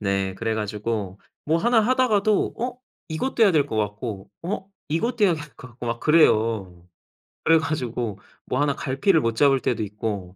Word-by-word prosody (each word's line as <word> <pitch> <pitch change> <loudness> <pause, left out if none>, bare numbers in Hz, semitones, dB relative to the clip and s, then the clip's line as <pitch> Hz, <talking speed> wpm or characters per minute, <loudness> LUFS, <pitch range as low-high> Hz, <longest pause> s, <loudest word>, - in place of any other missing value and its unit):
네. 95 -2 -1
그래 110 +2 -2
가지고 105 -2 -3 0.2
뭐 160 +2 +2
1 235 +3 +3
하다가도 215 -4 +2
어 250 +1 -3 0.3
이것도 230 +9 -1
해야 205 - +7
될 150 -3 +3
것 110 - -4
같고 105 -1 -3
어 190 +2 -4 0.2
이것도 215 +8 +1
해야 180 - +4
될 150 -2 -7
것 125 - -11
같고 120 0 -9
막 115 0 -2
그래요. 110 - +2 0.6
그래 165 0 +5
가지고 125 -9 -3 0.3
뭐 130 +3 -1
1 145 -1 +1
갈피를 150 +6 +2
못 115 -2 -1
잡을 135 0 +4
때도 110 - -1
있고. 100 -3 -5
125 Hz, 295 characters per minute, -24 LUFS, 105-165 Hz, 0.6 s, 해야